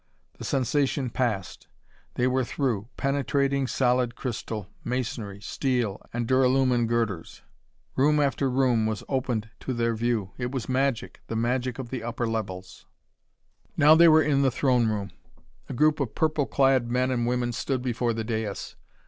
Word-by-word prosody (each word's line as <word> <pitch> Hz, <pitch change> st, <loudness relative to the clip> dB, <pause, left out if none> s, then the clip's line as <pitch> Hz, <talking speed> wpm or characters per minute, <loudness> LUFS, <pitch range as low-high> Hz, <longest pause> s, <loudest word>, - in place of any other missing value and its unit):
The -, -, -7 dB
sensation 135 Hz, 0 st, 0 dB
passed. 110 Hz, -9 st, -2 dB, 0.5 s
They 125 Hz, -, +1 dB
were 130 Hz, +1 st, +2 dB
through, 120 Hz, -5 st, -2 dB
penetrating 140 Hz, 0 st, 0 dB
solid 125 Hz, -2 st, +1 dB
crystal, 110 Hz, -5 st, -5 dB, 0.2 s
masonry, 115 Hz, -5 st, -3 dB
steel 120 Hz, -3 st, -1 dB
and 120 Hz, -1 st, -2 dB
duralumin 130 Hz, -2 st, +3 dB
girders. 115 Hz, -7 st, -2 dB, 0.5 s
Room 150 Hz, +3 st, +3 dB
after 140 Hz, -1 st, +1 dB
room 125 Hz, -4 st, +2 dB
was 110 Hz, -2 st, -3 dB
opened 120 Hz, -5 st, -2 dB
to 130 Hz, -, -4 dB
their 115 Hz, 0 st, +1 dB
view. 110 Hz, -4 st, -1 dB
It 120 Hz, 0 st, -2 dB
was 130 Hz, -5 st, -4 dB
magic 130 Hz, -2 st, -1 dB
the 115 Hz, -, -4 dB
magic 125 Hz, +2 st, -1 dB
of 130 Hz, -3 st, -7 dB
the 130 Hz, -3 st, -3 dB
upper 120 Hz, +1 st, -3 dB
levels. 95 Hz, -5 st, -5 dB, 0.9 s
Now 150 Hz, +2 st, +7 dB
they 170 Hz, +2 st, +7 dB
were 155 Hz, -1 st, +6 dB
in 140 Hz, -2 st, +2 dB
the 135 Hz, -, +4 dB
throne 125 Hz, -2 st, +2 dB
room. 100 Hz, -2 st, -3 dB, 0.6 s
A -, -, -4 dB
group 155 Hz, +4 st, +3 dB
of 135 Hz, -6 st, -2 dB
purple 155 Hz, -3 st, +1 dB
clad 135 Hz, -3 st, +2 dB
men 125 Hz, +1 st, +1 dB
and 120 Hz, -2 st, 0 dB
women 120 Hz, 0 st, 0 dB
stood 125 Hz, +2 st, -2 dB
before 120 Hz, -1 st, 0 dB
the 115 Hz, 0 st, -3 dB
dais. 110 Hz, -3 st, -4 dB
125 Hz, 155 wpm, -26 LUFS, 115-135 Hz, 0.9 s, Now